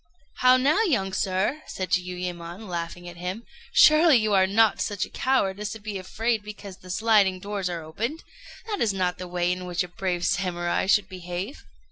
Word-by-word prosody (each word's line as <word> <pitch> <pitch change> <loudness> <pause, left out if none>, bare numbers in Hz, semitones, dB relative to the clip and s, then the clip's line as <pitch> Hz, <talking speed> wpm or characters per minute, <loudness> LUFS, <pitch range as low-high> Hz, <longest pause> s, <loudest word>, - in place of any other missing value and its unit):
"How 255 0 +6
now, 290 +11 +3
young 220 - +1
sir!" 190 +10 0
said 185 -2 -5
Jiuyémon, 180 +1 -3
laughing 175 0 -5
at 175 0 -9
him, 180 +6 -5 0.3
"surely 315 - +7
you 215 -2 +1
are 190 -1 +5
not 215 +2 +3
such 205 -2 -1
a - - -17
coward 205 -7 +1
as 210 0 -3
to 220 - -9
be 205 -2 -5
afraid 225 +4 -1
because 205 -2 -9
the 185 - -15
sliding 195 -1 +3
doors 200 -1 -3
are 170 -2 -4
opened? 230 - -4 0.4
That 420 -3 -3
is 215 -4 +2
not 180 -2 -1
the 180 - -6
way 175 0 0
in 180 0 -3
which 175 0 0
a - - -7
brave 175 -1 -2
Samurai 175 -1 0
should 200 -1 +3
behave." 180 - -6
190 Hz, 190 wpm, -25 LUFS, 180-220 Hz, 0.4 s, surely